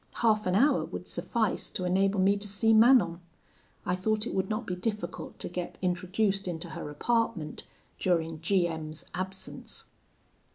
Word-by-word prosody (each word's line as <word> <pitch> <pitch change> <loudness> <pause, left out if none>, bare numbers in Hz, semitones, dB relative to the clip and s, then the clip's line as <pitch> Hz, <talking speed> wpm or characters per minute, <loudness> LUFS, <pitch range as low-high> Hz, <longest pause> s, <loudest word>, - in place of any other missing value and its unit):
Half 215 -3 +2
an 180 - +2
hour 275 +9 +4
would - - -7
suffice 225 -5 -1
to 185 - -3
enable 195 +2 +2
me 195 +2 +4
to 205 +1 -4
see 205 +3 +3
Manon. 220 -7 +6 0.7
I 180 - +1
thought 215 +3 0
it - - -4
would 190 0 0
not 215 +2 -2
be 180 - -2
difficult 210 +3 -4
to - - -4
get 175 0 -5
introduced 190 +2 0
into 170 -1 -3
her 155 - -6
apartment 225 -2 -1 0.3
during 165 -3 0
G 175 +1 +3
M 160 -2 -5
's 155 - -7
absence. 190 +1 -4
190 Hz, 165 wpm, -29 LUFS, 175-215 Hz, 0.7 s, Manon